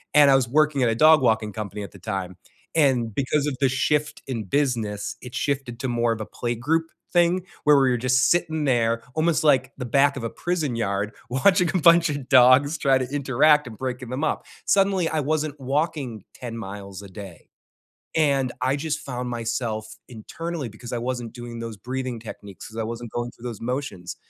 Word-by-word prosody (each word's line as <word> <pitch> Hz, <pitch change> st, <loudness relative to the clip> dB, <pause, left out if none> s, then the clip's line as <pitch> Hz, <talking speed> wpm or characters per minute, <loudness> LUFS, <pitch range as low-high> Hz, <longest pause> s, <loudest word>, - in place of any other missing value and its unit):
and 145 Hz, -2 st, +7 dB
I 135 Hz, -, +6 dB
was 125 Hz, -3 st, +1 dB
working 150 Hz, 0 st, +2 dB
at 120 Hz, -, +3 dB
a 115 Hz, -, 0 dB
dog 155 Hz, +4 st, +6 dB
walking 110 Hz, -4 st, +1 dB
company 105 Hz, 0 st, -5 dB
at 100 Hz, -, -9 dB
the 100 Hz, -, -12 dB
time, 95 Hz, -2 st, -4 dB, 0.4 s
and 130 Hz, -8 st, +2 dB
because 140 Hz, +2 st, 0 dB
of 140 Hz, -, -2 dB
the 135 Hz, -, +4 dB
shift 150 Hz, +3 st, 0 dB
in 120 Hz, -5 st, -3 dB
business, 110 Hz, -4 st, -1 dB
it 125 Hz, -1 st, -10 dB
shifted 135 Hz, -4 st, -2 dB
to 130 Hz, -, -2 dB
more 120 Hz, -1 st, +1 dB
of 115 Hz, -, -2 dB
a -, -, -4 dB
playgroup 120 Hz, +10 st, -1 dB, 0.3 s
thing 175 Hz, +1 st, +3 dB, 0.2 s
where 150 Hz, -1 st, +6 dB
we 135 Hz, -1 st, +3 dB
were 125 Hz, -, +1 dB
just 130 Hz, +2 st, +2 dB
sitting 160 Hz, -3 st, +1 dB
there 115 Hz, -3 st, +2 dB
almost 160 Hz, 0 st, +2 dB
like 135 Hz, -4 st, +3 dB
the 125 Hz, -, -4 dB
back 140 Hz, +3 st, +3 dB
of 120 Hz, -, -5 dB
a -, -, -2 dB
prison 160 Hz, -6 st, -2 dB
yard 100 Hz, -2 st, -1 dB, 0.2 s
watching 180 Hz, +8 st, +3 dB
a -, -, +2 dB
bunch 170 Hz, 0 st, +6 dB
of 145 Hz, -3 st, -4 dB
dogs 130 Hz, +4 st, +6 dB
try 135 Hz, -3 st, +3 dB
to 130 Hz, -, -2 dB
interact 145 Hz, +1 st, +3 dB
and 110 Hz, -3 st, -9 dB
breaking 125 Hz, 0 st, -4 dB
them 130 Hz, +5 st, -3 dB
up. 155 Hz, -, -1 dB, 0.2 s
Suddenly, 195 Hz, -3 st, +3 dB
I 155 Hz, -1 st, 0 dB
wasn't 150 Hz, 0 st, -1 dB
walking 135 Hz, -, -2 dB
10 120 Hz, -2 st, -7 dB
miles 100 Hz, -2 st, -7 dB
a 100 Hz, -, -10 dB
day, 95 Hz, -3 st, -11 dB, 0.7 s
and 140 Hz, -5 st, +2 dB
I 130 Hz, +2 st, +1 dB
just 150 Hz, +1 st, -2 dB
found 125 Hz, -2 st, -5 dB
myself 115 Hz, -2 st, -3 dB
internally 145 Hz, +5 st, -6 dB
because 115 Hz, +3 st, -10 dB
I 120 Hz, -, -1 dB
wasn't 120 Hz, -1 st, -4 dB
doing 120 Hz, -1 st, -8 dB
those 115 Hz, -2 st, -6 dB
breathing 125 Hz, +2 st, -4 dB
techniques, 100 Hz, -4 st, -10 dB
because 110 Hz, -, -10 dB
I -, -, -1 dB
wasn't 115 Hz, 0 st, -6 dB
going 120 Hz, 0 st, -3 dB
through 115 Hz, -, -17 dB
those 115 Hz, -, -7 dB
motions. 120 Hz, -8 st, -4 dB
130 Hz, 200 wpm, -24 LUFS, 115-145 Hz, 0.7 s, and